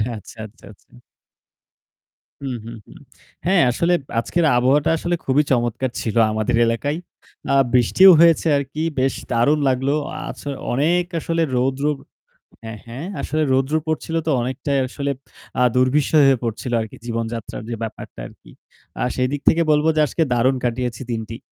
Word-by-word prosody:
আচ্ছা, 110 - -12
আচ্ছা, 110 +2 -16
আচ্ছা। 105 - -22 1.5
হুম, 135 -3 -4
হুম, 115 0 -8
হুম। - - -15 0.5
হ্যাঁ, 185 0 +4
আসলে 170 +8 +1 0.3
আজকের 170 +8 0
আবহাওয়াটা 130 +4 +3
আসলে 175 +2 -1
খুবই 140 +3 +3
চমৎকার 120 0 0
ছিল 110 - -3 0.2
আমাদের 110 +2 0
এলাকায়। 130 +6 -1 0.5
আ - - +3 0.2
বৃষ্টিও 130 - +6
হয়েছে 165 0 +5
আরকি 140 +2 -4 0.2
বেশ 135 +1 +1 0.2
দারুণ 125 +6 +3
লাগলো। 135 +2 0 0.3
আছ - - -8 0.3
অনেক 165 +7 +2 0.2
আসলে 165 +1 -1
রৌদ্র 130 +3 0 0.8
হ্যাঁ, 110 -1 -7
হ্যাঁ 125 +7 -7 0.2
আসলে 155 +1 -1
রৌদ্র 135 +3 +1
পড়ছিল 160 +1 -2
তো - - +2
অনেকটাই 130 +3 -1
আসলে 140 +2 -3 0.5
আ - - +2
দুর্বিষহ 140 +4 +3
হয়ে 135 -3 +3
পড়ছিল 115 +2 -4
আরকি 110 - -8
জীবনযাত্রার 115 -2 -4
যে 120 - -3
ব্যাপারটা 110 - -8
আরকি। - - -18 0.5
আর - - +1
সেদিক 130 +3 -1
থেকে 165 - +2
বলব 150 0 +2
যে - - +1
আজকে 165 - 0
দারুণ 125 +3 +2
কাটিয়েছি 125 +1 -2
দিনটি। 115 0 -4
130 Hz, 150 wpm, -21 LUFS, 120-150 Hz, 1.5 s, বৃষ্টিও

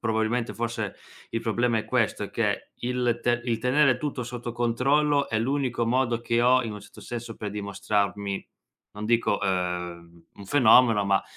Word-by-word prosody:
probabilmente 115 +1 -1
forse 115 -3 -3 0.4
il 115 - -2
problema 115 0 +1
è - - -3
questo, - - 0
è - - -8
che - - -1 0.2
il 120 -2 0
te 120 0 +1
il 115 -2 0
tenere 130 +1 +3
tutto 140 -3 -3
sotto 120 0 -6
controllo, 140 +5 +2
è 110 - 0
l'unico 125 -1 0
modo 120 -1 +1
che 115 0 0
ho, 130 +1 +5
in 110 -2 -4
un 105 - -8
certo - - -14
senso, 120 -1 -6
per 105 - -5
dimostrarmi, 100 0 -2 0.5
non 105 +1 -7
dico, 115 -2 +1
ehm, 90 -2 -3
un 100 - -11
fenomeno 115 -4 +5
ma 100 -1 +2
115 Hz, 170 wpm, -26 LUFS, 105-125 Hz, 0.5 s, ho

